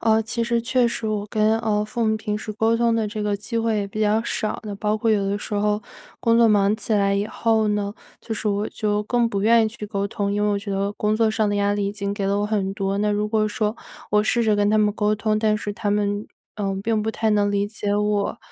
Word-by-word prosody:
呃， 220 -1 +3
其 235 +1 -3
实 235 0 +1
确 250 0 +2
实 230 -1 -4
我 210 -1 -2
跟， 215 +1 +2
呃， 210 -2 0
父 235 +2 -3
母 220 0 +2
平 210 -1 -3
时 215 - -6
沟 220 +2 +1
通 230 0 +2
的 220 -2 0
这 210 0 -4
个 205 -1 0
机 230 +3 -4
会 225 -1 +1
也 200 - -2
比 215 +2 -6
较 215 +1 +2
少， 215 -2 -2
那 205 -1 -5
包 210 +1 0
括 225 +1 +1
有 200 -2 +2
的 200 - 0
时 210 - -8
候 210 0 +1 0.4
工 230 0 +3
作 230 -1 +6
忙 205 0 +3
起 220 0 -2
来 200 -1 +2
以 200 +1 0
后 220 -1 +1
呢， 205 -1 -1 0.3
就 225 - -4
是 215 - -2
我 205 +1 0
就 210 -1 -1
更 235 +1 +1
不 200 -2 -2
愿 230 +1 +5
意 220 - +1
去 215 -1 -8
沟 200 -1 -2
通。 200 0 -2
因 205 0 0
为 210 - +2
我 200 - +1
觉 200 0 -7
得 195 +1 0
工 210 +1 0
作 220 0 +2
上 215 -1 +1
的 205 0 0
压 205 0 +1
力 205 -1 -1
已 200 - -2
经 200 -1 -3
给 200 -2 -3
了 200 +1 +1
我 205 - 0
很 200 -3 -1
多， 195 0 -2
那 210 +1 +1
如 210 +1 0
果 215 -1 +1
说 210 +1 -1 0.3
我 210 0 +4
试 235 +2 +1
着 215 -2 +2
跟 205 0 +2
他 215 - +3
们 210 -1 +3
沟 210 0 +1
通， 215 0 0
但 215 -1 +2
是 205 - -4
他 205 -1 -2
们， 205 0 0 0.3
呃， 195 -2 -2
并 220 -1 0
不 220 - -1
太 220 0 -1
能 205 -1 +2
理 200 0 +1
解 205 -1 -2
我 210 +1 0
210 Hz, 295 characters per minute, -23 LUFS, 205-220 Hz, 0.4 s, 作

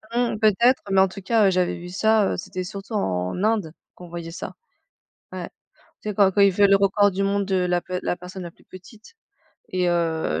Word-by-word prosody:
Mmh, 240 -3 0
peut-être. 235 +4 +3
Mais 190 0 +5
en 190 - +5
tout 190 +1 -10
cas, 215 +1 +3
heu, - - +3
j'avais 180 -1 0
vu 175 +1 -9
ça, 215 +2 +2
heu, - - -4
c'était 185 0 -5
surtout 200 +4 -8
en 90 - -2
Inde, 210 -7 0 0.2
qu'on 180 - -12
voyait 170 -1 -7
ça. 165 - -7 0.8
Ouais. - - -6 0.5
Tu 215 - -5
sais - - -2
quand 195 -1 +4
quand 200 - +2
il 200 0 +6
fait 200 +2 +4
le 195 - +5
record 200 +1 +3
du 195 +1 -2
monde 200 0 0
de 190 0 -1
la 180 -1 +1
de 180 +1 -4
la - - -1
personne 180 +1 -9
la 170 - -8
plus - - -26
petite 210 - -15 0.6
et 180 -1 0
heu, 165 - 0
190 Hz, 225 wpm, -23 LUFS, 180-205 Hz, 0.8 s, il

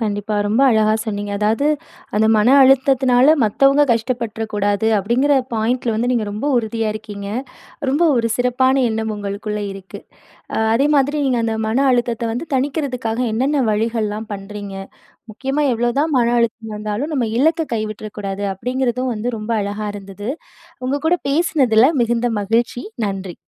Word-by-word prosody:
கண்டிப்பா. 210 -1 -2
ரொம்ப 215 +5 +1
அழகா 215 -2 +3
சொன்னீங்க. 205 -2 -4
அதாவது 220 +7 +1 0.5
"அந்த 215 +1 +3
மன 210 +2 +3
அழுத்தத்தினால 265 +1 +4
மத்தவங்க 275 +7 +4
கஷ்டப்பட்டுறக் 225 -2 -3
கூடாது." 205 +1 0
அப்பிடிங்கிற 240 +8 +2 0.2
பாயிண்ட்ல 230 +1 0
வந்து 235 +3 0
நீங்க 235 -3 0
ரொம்ப 210 +7 -4
உறுதிய 225 -1 -1
இருக்கீங்க. 205 -2 -7 0.6
ரொம்ப 290 +5 +1
ஒரு 230 -1 +1
சிறப்பான 260 +2 +2
எண்ணம் 220 0 -2
உங்களுக்குள்ளே 205 +1 -4
இருக்கு. 195 -1 -10 0.5
அ - - -2 0.2
அதே 270 +5 +3
மாதிரி 285 +2 +2
நீங்க 250 -3 +1
அந்த 225 -1 -1
மன 225 +4 0
அழுத்தத்த 235 -2 0
வந்து 245 +8 -4
தணிக்கிறதுக்காக 260 -4 -1
என்னன்ன 270 +5 +1
வழிகள்லாம் 220 0 -2
பண்றீங்க? 200 0 -8 0.6
முக்கியமா 270 +7 -2
எவ்ளோதான் 240 +7 0
மன 240 - +3
அழுத்தம் 230 -1 -1
இருந்தாலும், 210 +7 -3
நம்ம 265 -5 0
இலக்க 320 +5 +3
கைவிட்றக்கூடாது. 215 -2 -5
அப்பிடிங்கிறதும் 250 +4 -2
வந்து 220 +3 -3
ரொம்ப 215 +2 -6
அழகா 205 +1 -4
இருந்தது. 200 +1 -8 0.6
உங்ககூட 290 +6 +1
பேசினதில 275 -7 +3 0.2
மிகுந்த 235 +1 0
மகிழ்ச்சி. 230 +4 0 0.2
நன்றி. 195 -3 -5
230 Hz, 140 wpm, -19 LUFS, 210-260 Hz, 0.6 s, அழுத்தத்தினால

